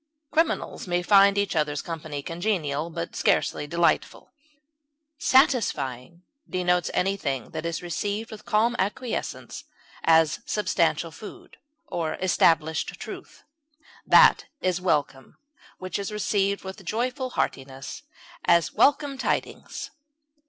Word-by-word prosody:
Criminals 320 - 0
may 175 0 0
find 200 +1 +6
each 200 -2 0
other's 150 -2 0
company 155 -4 -5
congenial, 165 -4 -2
but 170 0 -5
scarcely 145 - +1
delightful. 170 +2 0 0.9
Satisfying 175 - +1 0.3
denotes 180 -1 +1
anything 180 - -1
that 160 +1 -4
is 170 +1 -4
received 205 +5 -3
with 215 -1 -9
calm 225 +3 +2
acquiescence, 220 +5 -3 0.4
as 160 -1 +4
substantial 170 -6 0
food, 205 +6 -12 0.3
or 170 - -3
established 160 -3 +2
truth. - - -9 0.6
That - - +6
is 185 -1 0
welcome 145 -6 -1 0.4
which 185 0 -4
is 200 +1 -4
received 200 -1 0
with 190 +1 -8
joyful 250 +7 -2
heartiness; 135 - -3 0.4
as, 170 -1 +3
welcome 285 -1 +2
tidings. - - -3
180 Hz, 110 wpm, -25 LUFS, 160-205 Hz, 0.9 s, find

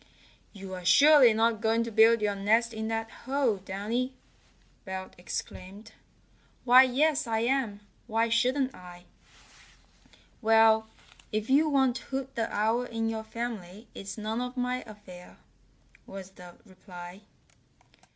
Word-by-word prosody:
"You're 190 -3 -9
surely 275 - +6
not 225 0 +1
going 225 +1 +1
to 230 - -6
build 225 +1 +5
your 205 -1 +1
nest 220 +4 +1
in 220 0 -4
that 225 0 -3
hole 260 -4 -1
Downy!" 215 +7 -4 0.7
Belt 190 -1 -7
exclaimed. 185 +3 -7 0.7
"Why, 250 +1 +8
yes, 275 +2 +1
I 225 -1 0
am! 235 -4 -1 0.3
Why 225 0 +1
shouldn't 255 +3 +1
I?" 175 -1 -13 1.4
"Well, 220 0 +4 0.4
if 215 +3 -3
you 305 +3 +4
want 265 -4 +2
Hoot 270 +1 -6
the 225 -1 -3
Owl 220 +3 +1
in 225 -2 -3
your 220 -1 -4
family 220 -3 -7
it's 195 +3 -8
none 220 +2 -3
of 250 +1 -6
my 250 0 -1
affair," 195 -4 -13 0.7
was 195 -1 -9
the 180 -2 -14
reply. 185 -1 -12
225 Hz, 130 wpm, -28 LUFS, 200-245 Hz, 1.4 s, Why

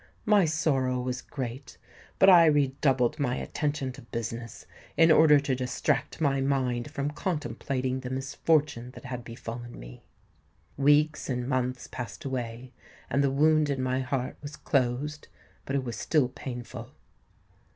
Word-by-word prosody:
My 210 -4 +5
sorrow 140 -5 +1
was 125 0 -3
great; 130 0 -7 0.4
but 190 - +5
I 175 -3 +8
redoubled 140 -1 +2
my 125 -3 0
attention 145 -2 -2
to - - -12
business 115 0 -6 0.3
in 165 0 +6
order 155 -2 +7
to 140 -1 -1
distract 125 +4 -1
my 140 -3 +1
mind 130 -3 0
from 140 +1 -3
contemplating 130 -5 -2
the 130 -1 -6
misfortune 135 -1 0
that - - -11
had 125 -2 -5
befallen 120 - -8
me. - - -11 0.7
Weeks 145 +2 +3
and 125 -1 -2
months 130 -1 -1
passed 120 +2 -7
away; 125 -1 -4 0.4
and 140 +1 +2
the 140 - +3
wound 155 +2 +3
in 135 -2 -1
my 130 0 0
heart 130 -1 -2
was 145 0 -7
closed, 140 +3 -1 0.4
but 135 - -2
it 135 - 0
was 120 -2 -5
still 145 -6 +2
painful. 125 -2 -7
130 Hz, 145 wpm, -28 LUFS, 125-145 Hz, 0.7 s, I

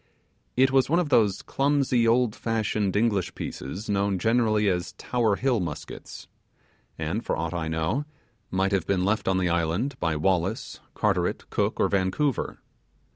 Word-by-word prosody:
It 130 +1 +5
was 135 -1 +3
one 165 - +3
of 175 -4 +1
those 105 -7 +3
clumsy, 135 -4 +2
old 115 -1 +3
fashioned, 110 -3 -1
English 105 -3 +1
pieces 90 +11 -6
known 100 -1 +1
generally 110 +1 +2
as 90 -1 -1
Tower 115 -4 0
Hill 125 0 +1
muskets, 85 -5 -7 0.7
and, 80 +9 -2
for - - -1
aught 80 0 -2
I 85 -2 -2
know, 80 - -1 0.4
might 95 +1 0
have 95 -2 0
been 95 -2 +1
left 105 +2 0
on 95 0 +2
the 90 -1 +1
island 85 - 0
by 80 -1 0
Wallace, 90 +5 -1 0.2
Carteret, - - 0
Cook, - - 0
or - - +4
Vancouver. 100 +8 0
100 Hz, 155 wpm, -26 LUFS, 90-120 Hz, 0.7 s, It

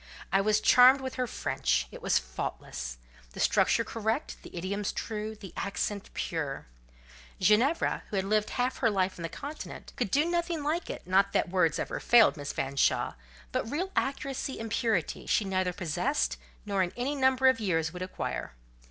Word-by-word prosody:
I 195 - +4
was 210 +1 +3
charmed 255 +4 +7
with 260 -1 -5
her 255 -1 -1
French; - - 0
it - - -10
was - - +3
faultless—the - - -6
structure - - +3
correct, 225 +5 -2
the - - -11
idioms 200 +3 -2
true, 215 -1 -4
the 195 -4 -11
accent 200 +1 -3
pure; 150 -5 -3 0.7
Ginevra, 225 - +3
who - - -4
had 190 0 0
lived 210 +1 +1
half 250 +1 -1
her 235 - +3
life 190 -3 0
on - - -6
the 165 - -3
Continent, 290 - -8
could 240 -5 -1
do 290 +9 +3
nothing 340 -2 -1
like 320 +4 -1
it - - -6
not 195 +2 +3
that - - +1
words 165 -4 +2
ever - - -3
failed 235 -5 +6
Miss 145 -2 -5
Fanshawe, 135 0 +1 0.4
but 225 - -2
real 360 +8 -2
accuracy 270 0 -2
and 225 -1 -5
purity 215 -9 0
she 215 - +2
neither 185 -1 0
possessed, 150 - -1 0.3
nor 200 -2 0
in 180 -1 -1
any 255 +4 -1
number 265 -1 +2
of 260 0 +6
years 165 -6 0
would 180 - -7
acquire. 185 - -4
205 Hz, 175 wpm, -29 LUFS, 175-255 Hz, 0.7 s, charmed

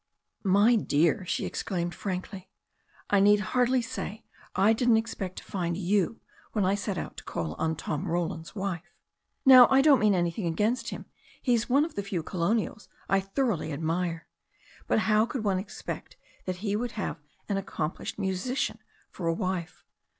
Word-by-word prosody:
"My 205 +4 +5
dear," 175 -1 +2
she - - -1
exclaimed 175 -2 -3
frankly, 190 0 -5 0.6
"I 200 - +5
need 205 +1 +6
hardly 250 0 +3
say 220 -1 -6 0.3
I 205 +4 +5
didn't 235 0 +4
expect 200 -5 -3
to - - -7
find 170 -3 -2
you 195 +3 0 0.3
when 210 -4 +1
I 190 - +3
set 200 -1 -2
out - - -5
to - - -8
call 80 -2 -3
on 160 0 0
Tom 150 -1 -3
Roland's 165 -1 -2
wife. 190 -3 -4 0.5
Now, 255 -2 +10
I 265 0 +5
don't 285 -4 +6
mean 210 -2 +4
anything 175 +2 0
against 225 +8 0
him. - - -7 0.3
He's 240 -2 +1
one 280 +4 +4
of 325 - -8
the 200 - -2
few 195 -4 -3
colonials 195 +3 -1 0.2
I 195 - +4
thoroughly 195 - -1
admire. 165 +3 -2 0.6
But - - +2
how 215 +1 +3
could 240 -2 -4
one 195 -3 +1
expect 195 - -7 0.3
that 185 - -2
he 205 0 +1
would 240 +2 -2
have 205 -5 -3 0.3
an 200 - 0
accomplished, 175 -4 -4
musician 195 +7 -1 0.3
for 175 - -4
a 165 - +3
wife. 185 -3 -3
195 Hz, 165 wpm, -28 LUFS, 175-225 Hz, 0.6 s, Now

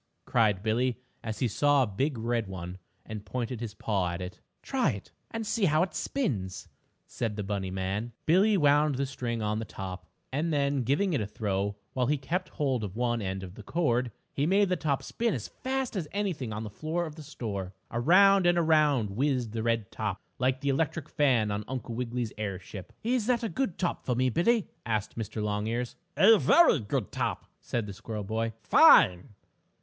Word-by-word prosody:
cried 105 -5 +2
Billie, 120 +3 +1 0.3
as 110 -2 -4
he 125 - +1
saw 145 +5 +3
a - - +2
big 125 +7 -1
red 115 -1 -1
one, 90 -1 -7 0.3
and 110 -2 -6
pointed 120 +3 -3
his 110 -3 -5
paw 100 -4 0
at 85 +1 -4
it. 90 0 -7 0.2
"Try 255 - +1
it 100 - -9 0.2
and 225 -1 -4
see 210 -1 +1
how 155 0 +4
it 185 - -4
spins," 105 - -2 0.4
said 115 -3 -3
the 105 - -3
bunny 95 -1 -2
man. 95 +5 -3
Billie 195 +6 +4
wound 145 -2 +4
the 140 +2 0
string 120 -4 -3
on 105 +1 0
the - - -3
top, 95 -4 -7 0.3
and 160 +4 0
then, 140 -2 +1
giving 150 - +1
it 140 - +1
a 105 - -2
throw, 100 -1 -2 0.2
while 125 -2 +1
he 150 +2 +2
kept 175 +7 -2
hold 135 -7 -1
of 100 -1 -5
one 120 -1 0
end 95 -1 -3
of 90 -1 -8
the 110 - -10
cord, 125 -1 0 0.2
he 145 +2 0
made 195 +2 +4
the 180 - +2
top 145 -6 -1
spin 235 -1 -1
as - - -5
fast 265 -2 -3
as 175 -6 -2
anything 185 - -2
on 105 +1 -4
the 105 - -6
floor 160 +9 -2
of 155 - -7
the 155 - -10
store. 100 -9 -5 0.2
Around 185 +9 +5
and 175 0 +4
around 150 -9 +3
whizzed 125 0 0
the 110 0 -3
red 115 -2 0
top, 105 -3 -3 0.2
like 130 +1 +1
the 140 - 0
electric 155 +2 -1
fan 125 -9 +2
on 100 +1 -2
Uncle 125 -3 -4
Wiggily's 120 -1 -3
airship. 100 -2 -5
"Is 235 -1 +1
that 245 -2 +2
a 225 - -1
good 260 -9 -2
top 180 - -1
for 125 - 0
me, 130 +1 +2
Billie?" 215 - +2 0.2
asked 110 -2 -2
Mr. 110 -1 -4
Longears. 110 +4 -2 0.2
"A 220 +1 +7
very 340 - +6
good 110 0 -2
top," - - -2
said 115 -3 -2
the 100 - -6
squirrel 105 +2 -6
boy. 115 +2 -2
"Fine!" 95 +5 +6
125 Hz, 200 wpm, -29 LUFS, 105-155 Hz, 0.4 s, A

